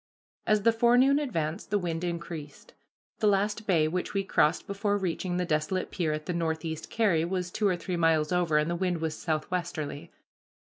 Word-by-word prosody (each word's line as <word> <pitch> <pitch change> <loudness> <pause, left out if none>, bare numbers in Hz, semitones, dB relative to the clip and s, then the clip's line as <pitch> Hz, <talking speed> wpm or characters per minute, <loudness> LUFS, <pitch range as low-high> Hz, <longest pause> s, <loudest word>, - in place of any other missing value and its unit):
As 215 -1 +3
the 230 - +6
forenoon 245 +5 +4
advanced 165 - -3
the 205 - +2
wind 170 -3 -3
increased. 170 -4 -6 0.5
The 215 - +2
last 210 +2 +1
bay 165 -5 +3
which 180 +5 -3
we 195 - +1
crossed 165 -3 +2
before 200 +1 0
reaching 180 -1 -2
the 180 - 0
desolate 155 +4 -1
pier 165 -4 -1
at 155 0 -3
the 180 - -2
Northeast 160 -1 -3
Carry, 200 -8 +2
was 180 0 -2
two 215 +1 +1
or 185 - +2
three 175 +1 -3
miles 160 -2 +2
over, 175 -4 +2
and 150 +1 +2
the 170 - -1
wind 180 -1 -1
was 160 -1 -2
southwesterly. 155 -2 -3
175 Hz, 185 wpm, -28 LUFS, 160-200 Hz, 0.5 s, the